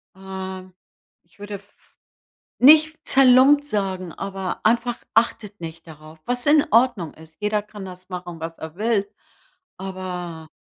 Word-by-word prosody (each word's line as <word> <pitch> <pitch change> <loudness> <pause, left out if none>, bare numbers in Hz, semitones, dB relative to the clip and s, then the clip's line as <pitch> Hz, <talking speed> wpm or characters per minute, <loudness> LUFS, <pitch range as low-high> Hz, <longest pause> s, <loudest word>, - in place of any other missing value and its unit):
ähm, 190 -1 -7 0.5
ich 225 - -30
würde 205 0 -6
f 200 - -9
f - - -30 0.7
nicht 310 +3 +7
zerlumpt 270 +2 +6
sagen, 190 -8 -2
aber 195 -1 -5
einfach 240 +2 +2 0.2
achtet 210 -3 0
nicht 165 0 -8
darauf, 155 0 -13
was 245 0 -2
in 295 0 +5
Ordnung 225 - +3
ist. 160 0 -17
Jeder 210 0 0
kann 205 -1 -10
das 185 0 -11
machen, 175 -2 -7
was 165 +1 -6
er 160 -1 -8
will, 210 0 0 0.7
aber. 180 -4 -6
195 Hz, 140 wpm, -22 LUFS, 180-235 Hz, 0.7 s, nicht